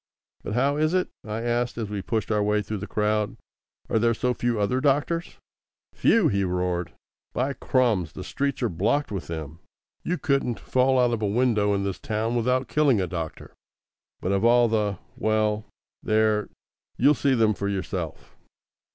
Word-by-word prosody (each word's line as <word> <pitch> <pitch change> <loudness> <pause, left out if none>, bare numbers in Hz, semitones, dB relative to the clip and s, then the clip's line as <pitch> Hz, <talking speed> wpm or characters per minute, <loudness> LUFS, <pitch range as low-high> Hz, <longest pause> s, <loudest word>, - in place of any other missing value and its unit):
"But 105 - -4
how 140 +3 +2
is 155 +3 +2
it?" 185 - +1
I 110 +1 -4
asked, 120 0 -1
as 110 -3 -4
we 100 -1 -3
pushed 110 +2 -2
our 105 -1 +2
way 105 0 +1
through 105 +1 -4
the 105 - -6
crowd, 105 0 0 0.5
"are 110 - +1
there 115 +1 +2
so 125 +2 0
few 120 -2 -1
other 125 +6 +1
doctors?" 150 +5 0 0.6
"Few!" 225 -8 +4
he 100 -5 +1
roared. 90 -2 -1 0.4
"By 135 +3 0
Crums, 115 - +1
the - - -7
streets 140 -2 -2
are 120 - +2
blocked 110 - 0
with 95 -4 -4
them. 80 -1 -6 0.4
You 180 - -1
couldn't 135 -6 0
fall 130 +1 +2
out 125 -1 +3
of 115 - -2
a 105 - +1
window 105 -2 +2
in 100 - -1
this 100 -1 -3
town 110 +2 -2
without 125 +2 +1
killing 145 -6 +3
a 95 - +1
doctor. 85 -2 -6 0.7
But 90 - -1
of 100 +1 +1
all 120 0 +5
the 105 -3 0 0.2
well, 110 -1 +1 0.4
there, 110 -1 +2 0.5
you'll 140 +5 +5
see 135 -1 +1
them 110 -2 +3
for 100 0 -3
yourself. 100 -2 -4
110 Hz, 175 wpm, -25 LUFS, 100-125 Hz, 0.7 s, all